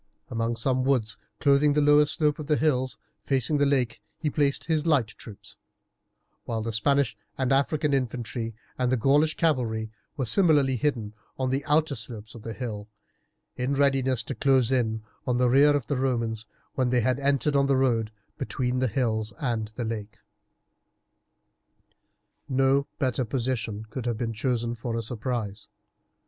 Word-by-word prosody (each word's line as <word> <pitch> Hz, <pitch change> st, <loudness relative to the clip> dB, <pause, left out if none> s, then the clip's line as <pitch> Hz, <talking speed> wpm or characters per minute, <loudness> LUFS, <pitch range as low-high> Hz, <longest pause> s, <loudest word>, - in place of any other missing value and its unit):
Among 115 Hz, 0 st, -1 dB
some 130 Hz, +2 st, 0 dB
woods 125 Hz, -4 st, +1 dB, 0.2 s
clothing 145 Hz, +1 st, +4 dB
the 150 Hz, -, +2 dB
lower 150 Hz, 0 st, +5 dB
slope 150 Hz, -1 st, 0 dB
of 150 Hz, -, -6 dB
the 150 Hz, -, +3 dB
hills 130 Hz, -4 st, +1 dB, 0.3 s
facing 135 Hz, +2 st, +1 dB
the 145 Hz, -, +4 dB
lake 125 Hz, -6 st, 0 dB, 0.2 s
he 150 Hz, -2 st, -2 dB
placed 140 Hz, -2 st, +1 dB
his 160 Hz, -1 st, 0 dB
light 135 Hz, -9 st, +3 dB
troops, 110 Hz, -2 st, -11 dB, 0.9 s
while 110 Hz, -1 st, -2 dB
the 115 Hz, -, -2 dB
Spanish 140 Hz, +4 st, +1 dB, 0.2 s
and 130 Hz, 0 st, +1 dB
African 145 Hz, +2 st, +1 dB
infantry 120 Hz, -3 st, -2 dB, 0.2 s
and 125 Hz, -1 st, +1 dB
the 130 Hz, -, +3 dB
Gaulish 145 Hz, +6 st, +3 dB
cavalry 115 Hz, -9 st, 0 dB, 0.3 s
were 130 Hz, -, 0 dB
similarly 145 Hz, -, +3 dB
hidden 115 Hz, -5 st, -1 dB, 0.2 s
on 130 Hz, -1 st, -1 dB
the 135 Hz, +2 st, 0 dB
outer 150 Hz, 0 st, +2 dB
slopes 110 Hz, -3 st, -8 dB
of 115 Hz, -, -10 dB
the 115 Hz, +1 st, -6 dB
hill 105 Hz, -5 st, -5 dB, 0.7 s
in 125 Hz, +3 st, 0 dB
readiness 135 Hz, -4 st, +2 dB
to 135 Hz, -, -4 dB
close 135 Hz, -3 st, +3 dB
in 110 Hz, -4 st, 0 dB, 0.2 s
on 125 Hz, -1 st, +1 dB
the 125 Hz, 0 st, +3 dB
rear 145 Hz, +3 st, +5 dB
of 140 Hz, -, -1 dB
the 140 Hz, -, -1 dB
Romans 115 Hz, -4 st, -1 dB, 0.3 s
when 130 Hz, -2 st, +1 dB
they 125 Hz, -1 st, +2 dB
had 130 Hz, +3 st, +1 dB
entered 140 Hz, +1 st, +1 dB
on 140 Hz, 0 st, +3 dB
the 135 Hz, -1 st, +3 dB
road 115 Hz, -5 st, +1 dB, 0.3 s
between 125 Hz, +2 st, -1 dB
the 130 Hz, -, +2 dB
hills 110 Hz, -3 st, -1 dB
and 115 Hz, -5 st, -1 dB
the 120 Hz, -, -3 dB
lake. 110 Hz, 0 st, -5 dB, 2.3 s
No 135 Hz, +1 st, +2 dB
better 130 Hz, -1 st, 0 dB
position 115 Hz, -3 st, -2 dB
could 125 Hz, 0 st, -4 dB
have 120 Hz, -2 st, -1 dB
been 115 Hz, -1 st, -2 dB
chosen 120 Hz, 0 st, -1 dB
for 120 Hz, 0 st, -4 dB
a 115 Hz, -, -2 dB
surprise. 110 Hz, -3 st, -4 dB
130 Hz, 165 wpm, -26 LUFS, 115-140 Hz, 2.3 s, lower